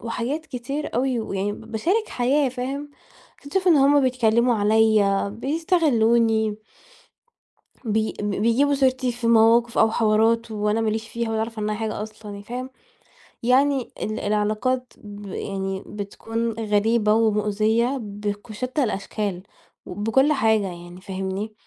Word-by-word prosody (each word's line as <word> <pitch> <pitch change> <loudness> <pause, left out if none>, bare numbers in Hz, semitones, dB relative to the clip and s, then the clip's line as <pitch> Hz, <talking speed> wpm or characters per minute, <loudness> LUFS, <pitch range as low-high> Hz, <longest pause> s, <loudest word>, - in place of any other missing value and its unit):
وحاجات 245 +7 -3
كتير 275 +4 -5
أوي، 250 0 0
ويعني 200 -1 -2
ب - - -9
باشارك 370 - 0
حياة، 265 +3 +1
فاهم؟ 270 +3 -5 0.5
أكتشِف 365 +6 -1
إن 335 - +6
هُم 285 +1 +5
بيتكلّموا 245 -2 +2
عليَّ، 210 -2 +3
بيستغلّوني 235 - +2 1.3
بي 220 0 0
ب 205 0 -1
بيجيبوا 240 +7 +2
سيرتي 260 -2 +1
في 240 0 -4
مواقف 230 +1 +4
أو 220 - +5
حوارات 225 +1 +2
وأنا 210 +1 0
ما 225 -1 +1
ليش 220 +1 -4
فيها 235 0 -3
ولا 220 - -1
أعرف 225 0 -3
عنّها 210 0 -1
حاجة 215 -1 -3
أصلًا 215 0 -9
يعني، 200 0 -8
فاهم؟ 250 +3 -6 0.7
يعني 265 +1 +2
ال 215 +1 -3
العلاقات 215 +5 -1
ب 205 0 -11
يعني 195 0 -4
بتكون 225 +3 -4
غريبة 215 0 +1
ومؤذية، 220 +3 +1
بك 205 0 -5
بشتّى 255 +6 -2
الأشكال 200 -3 -3 0.4
وبكل 225 +10 +1
حاجة 220 -6 +2
يعني، 175 0 -10
فاهمني؟ 190 +3 -4
225 Hz, 135 wpm, -23 LUFS, 210-255 Hz, 1.3 s, إن